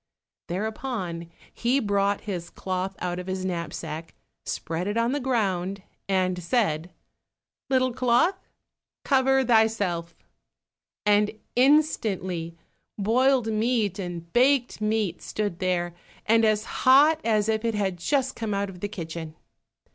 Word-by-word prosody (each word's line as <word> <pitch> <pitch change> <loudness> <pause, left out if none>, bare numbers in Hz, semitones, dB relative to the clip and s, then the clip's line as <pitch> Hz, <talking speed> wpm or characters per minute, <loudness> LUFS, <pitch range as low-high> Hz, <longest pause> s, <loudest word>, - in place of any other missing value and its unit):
Thereupon 190 -3 -4 0.2
he 245 +4 +1
brought 200 -3 +1
his 180 -5 -5
cloth 185 +1 -3
out 180 0 -3
of 180 - -7
his 185 0 -3
knapsack, 165 -2 -5 0.3
spread 165 +3 -3
it 205 +2 -1
on 230 +1 +2
the 290 - 0
ground, 200 -7 -1 0.3
and 185 -2 +1
said, 170 -4 0 0.8
"Little 255 -1 +2
cloth, 255 +10 +2 0.7
cover 265 -1 +3
thyself," 220 -7 +2 0.9
and 210 0 +4 0.3
instantly 200 - +2 0.4
boiled 235 +2 +2
meat 215 -3 0
and 170 -2 -6
baked 250 -2 +3
meat 215 -4 0
stood 205 -5 -3
there, 175 -2 0 0.3
and 225 +1 +4
as 215 -1 +2 0.2
hot 295 +5 +6
as 215 -2 +2
if 220 0 0
it 230 -1 0
had 195 -3 -1
just 265 - 0
come 220 -3 -2
out 200 0 -1
of 180 - -12
the 205 - -3
kitchen. 165 -5 -6
205 Hz, 125 wpm, -26 LUFS, 180-240 Hz, 0.9 s, hot